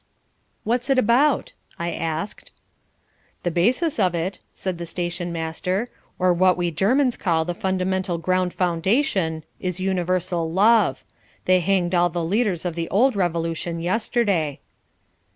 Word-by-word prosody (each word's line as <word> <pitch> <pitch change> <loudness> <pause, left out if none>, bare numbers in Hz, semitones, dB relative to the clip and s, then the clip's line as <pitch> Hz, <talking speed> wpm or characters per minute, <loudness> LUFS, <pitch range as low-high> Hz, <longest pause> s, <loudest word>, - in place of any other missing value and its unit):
"What's 245 +4 0
it 270 - +3
about?" 260 - +3 0.2
I 170 0 -2
asked. 165 +4 -4 0.9
"The 175 - 0
basis 250 - +1
of 180 -2 +2
it," 170 +4 -3
said 185 -3 -4
the 170 - -5
stationmaster, 175 +4 -3 0.3
"or 180 -1 +3
what 185 +1 +3
we 175 -1 0
Germans 245 - +2
call 165 -4 0
the 175 - -2
Fundamental 185 0 -1
Ground 185 +2 0
Foundation, 180 - 0 0.2
is 185 0 -3
universal 180 -2 -1
love. 200 - +3 0.4
They 185 0 +4
hanged 180 -1 +1
all 175 0 +3
the 170 0 -3
leaders 195 -2 0
of 175 - -1
the 165 0 -4
Old 245 +5 +3
Revolution 170 -2 -1
yesterday." 185 - 0
180 Hz, 135 wpm, -23 LUFS, 170-200 Hz, 0.9 s, They